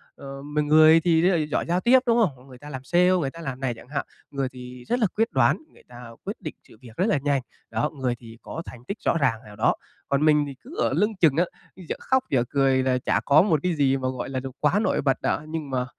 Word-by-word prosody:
ờ, 135 Hz, 0 st, -9 dB
mọi 150 Hz, +1 st, -1 dB
người 155 Hz, +2 st, +6 dB
thì 165 Hz, -1 st, +3 dB
rất 180 Hz, -, +4 dB
là 175 Hz, -, +2 dB
giỏi 150 Hz, -, -2 dB
giao 175 Hz, +2 st, +1 dB
tiếp, 255 Hz, +2 st, +6 dB
đúng 235 Hz, 0 st, +4 dB
không? 160 Hz, -11 st, +1 dB
Mọi 125 Hz, -, -18 dB
người 130 Hz, -2 st, -13 dB
ta 145 Hz, +3 st, -11 dB
làm 130 Hz, -2 st, -7 dB
sale, 180 Hz, +4 st, +3 dB
người 160 Hz, -7 st, +1 dB
ta 165 Hz, -, -11 dB
làm 135 Hz, -4 st, -5 dB
này 130 Hz, -3 st, -1 dB
chẳng 115 Hz, -, -14 dB
hạn, 145 Hz, -, -2 dB, 0.3 s
người 135 Hz, -2 st, -2 dB
thì 125 Hz, -1 st, -11 dB
rất 245 Hz, -, 0 dB
là 215 Hz, -, +3 dB
quyết 225 Hz, +2 st, +1 dB
đoán, -, -, +3 dB, 0.2 s
người -, -, -20 dB
ta 120 Hz, -1 st, -11 dB
quyết -, -, -6 dB
định -, -, -6 dB
sự -, -, -17 dB
việc 115 Hz, -3 st, -14 dB
rất 185 Hz, -, +2 dB
là 150 Hz, -, +2 dB
nhanh, 140 Hz, -2 st, +1 dB, 0.3 s
đó, 115 Hz, +7 st, 0 dB
người 125 Hz, -2 st, 0 dB
thì 115 Hz, -1 st, -13 dB
có 165 Hz, -, -6 dB
thành 120 Hz, -1 st, -11 dB
tích 205 Hz, -, -4 dB
rõ 170 Hz, -, +3 dB
ràng 125 Hz, -7 st, +1 dB
nào 105 Hz, -1 st, -12 dB
đó. 110 Hz, -, +2 dB, 0.3 s
Còn 140 Hz, +2 st, +2 dB
mình 150 Hz, -1 st, +4 dB
thì 135 Hz, -, -8 dB
cứ 310 Hz, -, -12 dB
ở -, -, +1 dB
lưng 210 Hz, +1 st, +1 dB
chừng 150 Hz, -5 st, +5 dB
á, 175 Hz, -, +4 dB, 0.3 s
dở 185 Hz, -4 st, -6 dB
khóc 260 Hz, 0 st, +1 dB
dở 125 Hz, -3 st, +2 dB
cười 135 Hz, -2 st, +2 dB
là 130 Hz, -1 st, +2 dB
chả 125 Hz, -, 0 dB
có 145 Hz, +2 st, +6 dB
một 165 Hz, -7 st, +2 dB
cái 180 Hz, -2 st, 0 dB
gì 135 Hz, -2 st, +2 dB
mà, 130 Hz, -1 st, -2 dB
gọi 130 Hz, 0 st, -5 dB
là, 130 Hz, -1 st, -2 dB
đồ 130 Hz, 0 st, -6 dB
quá 155 Hz, +7 st, +2 dB
nổi -, -, +1 dB
bật 135 Hz, -1 st, 0 dB
đó, 150 Hz, -, -1 dB
nhưng 155 Hz, -3 st, -5 dB
mà, 125 Hz, -1 st, -1 dB
140 Hz, 280 wpm, -25 LUFS, 130-170 Hz, 0.3 s, người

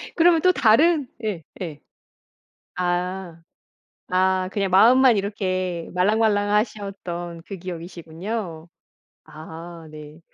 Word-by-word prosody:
그러면 335 Hz, -1 st, +5 dB
또 365 Hz, -, +5 dB
다른 290 Hz, +5 st, +4 dB, 0.2 s
예 195 Hz, -7 st, -3 dB, 0.2 s
예. 155 Hz, -5 st, -6 dB, 0.9 s
아. 180 Hz, -1 st, -2 dB, 0.7 s
아 185 Hz, 0 st, +2 dB
그냥 195 Hz, -2 st, 0 dB
마음만 245 Hz, +4 st, +6 dB
이렇게 185 Hz, -4 st, -2 dB
말랑말랑하셨던 205 Hz, -3 st, 0 dB
그 195 Hz, -, -7 dB
기억이시군요. 170 Hz, +1 st, -6 dB, 0.6 s
아 165 Hz, +1 st, -10 dB
네. 150 Hz, +1 st, -11 dB
185 Hz, 195 characters per minute, -23 LUFS, 170-210 Hz, 0.9 s, 마음만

